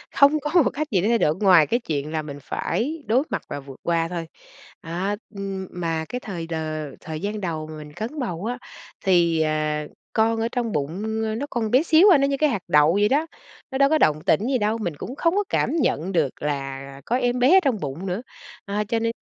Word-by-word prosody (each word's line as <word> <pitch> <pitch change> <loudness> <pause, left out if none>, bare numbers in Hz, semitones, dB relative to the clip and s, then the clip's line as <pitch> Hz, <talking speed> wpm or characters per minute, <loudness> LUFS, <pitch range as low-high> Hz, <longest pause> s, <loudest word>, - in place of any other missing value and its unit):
không 285 +2 +5
có 310 +4 +3
một - - +3
cách 305 +1 -2
gì 185 - +3
để 205 - +1
thay 235 - +4
đổi 155 -7 +2
ngoài 180 -6 +5
cái 240 - +1
chuyện 150 - -3
là 155 -1 -1
mình 145 -1 -8
phải 285 - -2
đối 250 +6 +3
mặt - - -2
và 145 - -4
vượt 135 -1 -12
qua 165 -1 +1
thôi. 170 -1 -5 0.5
À, 185 +3 -2 0.2
ừm, 195 -1 -4
mà 165 -2 -2
cái 250 - -3
thời 175 -6 -5
đ 165 - -5 0.5
thời 155 -1 -6
gian 205 +1 -3
đầu 160 -4 -3
mà 155 0 -8
mình 150 -1 -10
cấn 240 - -5
bầu 185 -6 -3
á 245 +1 -2 0.5
thì, 170 -4 +3
ờ, 155 -1 0 0.3
con 225 0 +2
ở 230 - +1
trong 240 -3 -1
bụng, 205 +9 -2
ơ, 220 0 -1
nó 260 +6 -3
còn 225 -3 -2
bé 255 +5 +5
xíu 335 +5 +6
à, - - +6
nó 275 0 +2
như 275 - 0
cái 305 +1 +3
hạt 215 -8 -2
đậu 150 0 +5
vậy 205 +1 +3
đó, 300 +4 +2 0.4
nó 265 - -2
đâu 275 0 +5
có 315 - +4
động 155 - +3
tĩnh 210 - +3
gì 265 -1 +2
đâu, 215 +1 0
mình 175 -8 -3
cũng 250 - -6
không 335 +4 +1
có 410 - +2
cảm - - +1
nhận 190 - 0
được 160 -7 0
là 135 -1 -4
có 240 - 0
em 245 -1 0
bé 265 +10 +6
ở - - +8
trong 255 -7 +1
bụng 150 +4 -5
nữa. 185 +3 -2 0.4
À, 205 +1 -1
cho 230 - +1
nên 230 0 0
200 Hz, 245 wpm, -23 LUFS, 160-245 Hz, 0.5 s, ở